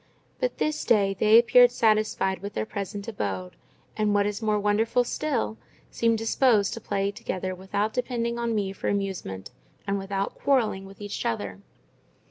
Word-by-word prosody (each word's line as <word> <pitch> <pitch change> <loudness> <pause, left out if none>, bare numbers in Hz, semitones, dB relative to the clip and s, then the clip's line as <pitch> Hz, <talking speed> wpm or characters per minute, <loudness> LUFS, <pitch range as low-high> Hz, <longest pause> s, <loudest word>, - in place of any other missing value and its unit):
But - - -1
this 305 0 -1
day 200 -4 +3
they 215 +1 +6
appeared 245 +1 +7
satisfied 215 -5 +1
with 200 +1 -6
their 110 - -1
present 200 - -5
abode, 95 - -4 0.4
and 210 -1 +1
what 200 0 +3
is 205 +1 -3
more 215 -1 +1
wonderful 220 +4 +2
still, 240 - -2 0.3
seemed 230 -1 +2
disposed 225 -2 +2
to 230 - -7
play 200 0 -1
together 185 -2 -4
without 195 +3 -2
depending 235 -2 -2
on 235 -1 -1
me 195 -2 -1
for - - -5
amusement, 190 - -3 0.3
and 200 0 -1
without 195 0 -3
quarrelling 225 -8 +1
with 195 +1 -14
each 205 0 -4
other. 100 -4 -3
205 Hz, 160 wpm, -26 LUFS, 195-230 Hz, 0.4 s, appeared